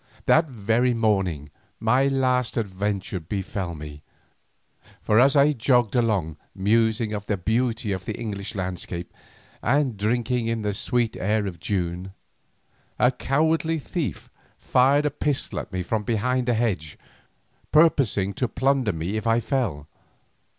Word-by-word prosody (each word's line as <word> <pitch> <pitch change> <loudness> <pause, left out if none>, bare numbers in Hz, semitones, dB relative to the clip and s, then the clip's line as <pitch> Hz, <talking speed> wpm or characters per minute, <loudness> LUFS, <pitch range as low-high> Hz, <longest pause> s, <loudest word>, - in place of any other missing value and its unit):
That 160 0 +4
very 120 +1 +1
morning 95 -10 0 0.3
my 125 +5 +3
last 130 -3 +1
adventure 100 -2 -2
befell 95 0 -4
me, 75 -1 -9 1.0
for 110 - +4
as 135 +3 +5
I 145 +1 +5
jogged 120 -3 +2
along 100 - 0 0.2
musing 110 +2 +1
of 105 -1 -5
the 105 - 0
beauty 110 +3 0
of 95 -1 -3
the - - -4
English 105 -2 -5
landscape 90 -2 -5 0.5
and 130 -2 +1
drinking 120 +3 0
in 115 -1 -1
the 105 -1 -1
sweet 115 +3 0
air 105 +2 0
of 90 -4 -6
June, 90 0 -3 0.8
a 125 - +4
cowardly 160 +5 +1
thief 155 0 -4 0.3
fired 140 +4 +3
a 150 - +1
pistol 145 -1 -2
at - - -8
me 95 -1 -2
from 110 +4 -1
behind 125 +3 0
a 120 - +3
hedge, 95 -10 -1 0.7
purposing 135 - +3
to 125 +6 -1
plunder 130 -3 +1
me 85 +6 -3
if 110 +1 -3
I 115 +1 +3
fell. 110 - -2
110 Hz, 140 wpm, -24 LUFS, 95-125 Hz, 1.0 s, as